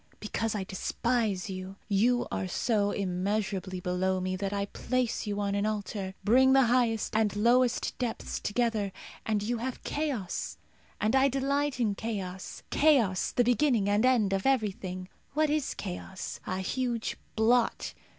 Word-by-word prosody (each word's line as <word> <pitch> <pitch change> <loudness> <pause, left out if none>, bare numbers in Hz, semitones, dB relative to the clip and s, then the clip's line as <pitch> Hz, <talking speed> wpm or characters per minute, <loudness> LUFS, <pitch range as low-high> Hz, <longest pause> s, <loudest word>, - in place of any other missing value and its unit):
Because 220 +1 -2
I 200 - -1
despise 210 +1 -1
you. 190 0 -6
You 235 +4 +3
are 190 - -2
so 205 +2 +1
immeasurably 195 0 -1
below 185 +1 0
me 185 0 -1
that 195 +1 -2
I 200 0 -1
place 245 +2 -1
you 205 0 -2
on 200 -1 0
an 200 +1 +1
altar. 200 -2 -3
Bring 260 +5 +5
the 270 0 +6
highest 235 -3 +1
and 215 -2 +2
lowest 240 +3 +3
depths 240 -3 -3
together, 215 -2 0 0.4
and 210 -2 +1
you 235 +2 -1
have 255 +2 -4
Chaos, 275 - -2 0.4
and 220 +4 +2
I 265 +1 +5
delight 275 +1 0
in 220 -4 +2
Chaos 195 -4 -5
Chaos, 250 -12 +3
the 245 - +3
beginning 240 -3 +3
and 205 +2 +3
end 235 -6 +3
of 195 +5 0
everything. 190 -7 -1 0.3
What 305 0 +2
is 300 -2 0
Chaos? 190 0 -6
A 185 - -1
huge 240 +3 -1 0.2
blot. 230 +2 +2
215 Hz, 150 wpm, -29 LUFS, 195-245 Hz, 0.4 s, the